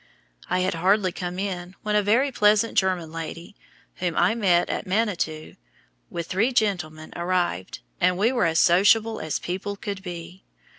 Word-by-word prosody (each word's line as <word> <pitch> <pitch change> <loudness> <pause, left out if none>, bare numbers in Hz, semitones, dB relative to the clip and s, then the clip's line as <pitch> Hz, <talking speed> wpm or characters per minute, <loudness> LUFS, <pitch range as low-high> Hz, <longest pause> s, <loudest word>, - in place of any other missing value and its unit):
I 185 +1 +1
had 185 +1 0
hardly 185 +3 +2
come 180 0 -5
in 185 -2 -4
when 210 0 0
a 210 - +4
very 235 +8 +2
pleasant 210 -1 +3
German 185 -4 +1
lady, 165 +4 -7 0.4
whom 175 -3 -2
I 175 +5 +4
met 185 -7 +2
at - - -3
Manitou, 185 -6 -2 0.5
with 170 - -4
three 210 +9 +1
gentlemen, 175 -9 -1
arrived, 175 - -2 0.2
and 180 0 +2
we 215 +5 +3
were 250 - +1
as 165 -1 +1
sociable 210 +6 +4
as 155 -2 -2
people 190 +3 -4
could 200 -1 -6
be. 180 0 -8
185 Hz, 160 wpm, -24 LUFS, 175-210 Hz, 0.5 s, a